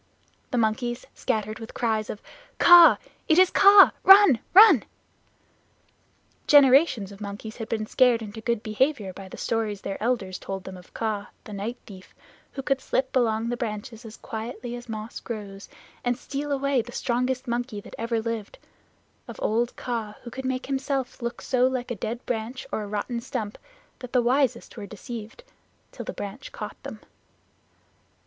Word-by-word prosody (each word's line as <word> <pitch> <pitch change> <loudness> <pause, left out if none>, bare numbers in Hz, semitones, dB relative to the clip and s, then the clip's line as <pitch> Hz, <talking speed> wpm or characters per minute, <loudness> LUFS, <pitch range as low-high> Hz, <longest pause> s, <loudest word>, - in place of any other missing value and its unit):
The 250 - -2
monkeys 240 +2 -1
scattered 215 +1 -2
with 225 - -10
cries 220 -3 -1
of 210 - -7 0.3
"Kaa! 350 -1 +8 0.3
It 315 - +4
is 370 0 +6
Kaa! 400 0 +8
Run! 385 - +8
Run!" 385 - +8 1.7
Generations 270 - +5
of 200 +1 -13
monkeys 205 +2 -7
had 225 -2 -6
been 220 -1 -2
scared 240 0 +3
into 215 +1 -8
good 235 -1 -1
behavior 215 -2 0
by 195 0 -10
the - - -10
stories 215 -3 -2
their 195 - -5
elders 210 -6 -1
told 195 -1 -6
them 190 - -8
of 180 -1 -15
Kaa, 215 -3 -2 0.2
the 210 - -10
night 210 +5 -4
thief, 190 -4 -14 0.4
who 270 - -5
could 270 0 0
slip 260 0 -1
along 230 -2 +1
the 240 - -2
branches 220 -1 -5
as 225 -1 -11
quietly 235 +2 -6
as 240 0 -10
moss 220 +1 -6
grows, 200 -4 -8 0.3
and 245 -1 0
steal 285 +3 -5
away 275 -2 +1
the 245 - -11
strongest 250 +2 -1
monkey 240 -2 -3
that - - -13
ever 230 0 -1
lived; 225 -2 -5 0.7
of - - -8
old 235 +3 0
Kaa, 225 -4 -4
who 240 - -9
could 265 +3 -7
make 260 0 -2
himself 270 -1 -3
look 235 0 -5
so 255 -1 +2
like 255 -2 -3
a - - -2
dead 230 +4 -5
branch 240 +2 -4
or - - -2
a 210 - -6
rotten 210 +4 -3
stump 225 -4 -5 0.4
that 250 -2 -10
the 250 -2 +3
wisest 250 -1 0
were 205 -2 -7
deceived, 225 - -9 0.5
till - - -8
the - - -4
branch 205 - -8
caught - - -8
them. - - -9
235 Hz, 170 wpm, -25 LUFS, 215-260 Hz, 1.7 s, Kaa